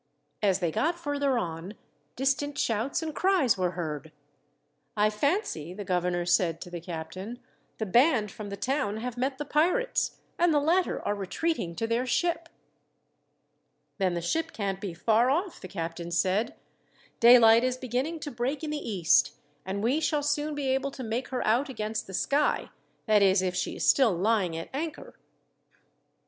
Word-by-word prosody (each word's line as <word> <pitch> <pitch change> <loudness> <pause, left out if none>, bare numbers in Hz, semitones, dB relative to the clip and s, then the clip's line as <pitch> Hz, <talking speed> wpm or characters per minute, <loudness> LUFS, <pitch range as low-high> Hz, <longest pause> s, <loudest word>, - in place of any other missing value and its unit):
As 195 -2 +2
they 170 -2 +1
got 335 - 0
further 285 -5 0
on, 170 0 -4 0.4
distant 270 +2 0
shouts 230 +8 0
and 315 -1 -4
cries 365 - +3
were 180 -2 -1
heard. 155 -2 -4 0.9
"I 210 +1 +3
fancy," 210 - -1
the 205 0 -6
governor 180 -1 0
said 175 -2 +2
to 175 - -8
the 175 -1 -5
captain, 180 +7 -6 0.4
"the 220 - -2
band 235 - +3
from 210 0 -8
the 200 - -6
town 255 -3 -1
have 240 +2 -4
met 260 +2 -1
the 295 - -4
pirates, 360 - +1 0.2
and 345 0 +4
the 295 - +4
latter 340 +5 +1
are 205 - +2
retreating 200 - -2
to 225 - -2
their 235 +3 0
ship." 335 +5 0 1.5
"Then 185 -2 +1
the 170 - -3
ship 320 - -1
can't 195 -2 -3
be 190 -5 -5
far 225 +7 +3
off," 340 +7 -1
the 185 - -7
captain 170 -1 -5
said. 185 - 0 0.6
"Daylight 235 -1 +7
is 255 0 0
beginning 260 +6 -3
to 290 - -5
break 255 +5 -2
in 305 - -3
the 300 - -1
east, 190 - +2 0.3
and 200 +2 -3
we 260 +7 +2
shall 300 -2 0
soon 295 +1 -1
be 285 -2 -2
able 270 +1 +1
to 270 -1 -8
make 235 +3 -2
her 255 -2 -3
out 245 +7 +2
against 220 -3 -3
the 190 - -6
sky 285 +8 +1 0.3
that 215 -2 +4
is, 190 -1 +4
if 180 -1 0
she - - -2
is - - -2
still 255 -7 +5
lying 185 -2 +1
at 165 - -6
anchor." 310 +3 -5
230 Hz, 175 wpm, -28 LUFS, 185-285 Hz, 1.5 s, Daylight